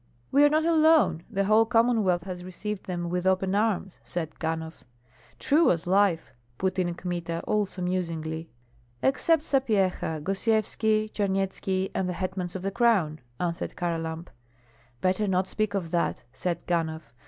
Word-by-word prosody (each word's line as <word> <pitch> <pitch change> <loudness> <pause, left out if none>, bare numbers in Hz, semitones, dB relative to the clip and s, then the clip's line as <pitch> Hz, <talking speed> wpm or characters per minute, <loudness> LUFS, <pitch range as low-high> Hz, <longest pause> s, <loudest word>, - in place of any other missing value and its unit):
"We 285 +2 +5
are 290 - +7
not 310 +2 +2
alone; 315 - +4
the 195 - 0
whole 215 +3 +5
Commonwealth 225 -7 +2
has 180 -2 -6
received 190 +2 -5
them 175 -2 -3
with 180 +1 -1
open 190 0 +2
arms," 205 -3 0
said 165 -3 -5
Ganhoff. 160 0 -4 0.5
"True 315 +4 +3
as 165 -2 +1
life," 185 -5 +2 0.2
put 190 0 -1
in 175 -1 0
Kmita, 170 -2 -4
also 205 -3 -1
musingly. 165 -3 -3 0.5
"Except 290 +4 +3
Sapyeha, 195 - +1
Gosyevski, 215 +2 +1
Charnyetski, 195 -1 -1
and 185 -1 -1
the - - -1
hetmans 185 -1 -4
of 185 - -5
the 195 - -1
crown," 195 -9 +2 0.2
answered 170 -1 -3
Kharlamp. 165 -1 -3 0.7
"Better 185 +4 +1
not 185 0 +1
speak 215 0 -1
of 170 -4 -3
that," 170 -1 0
said 170 +6 -3
Ganhoff. 160 -6 -2
185 Hz, 145 wpm, -27 LUFS, 170-215 Hz, 0.7 s, are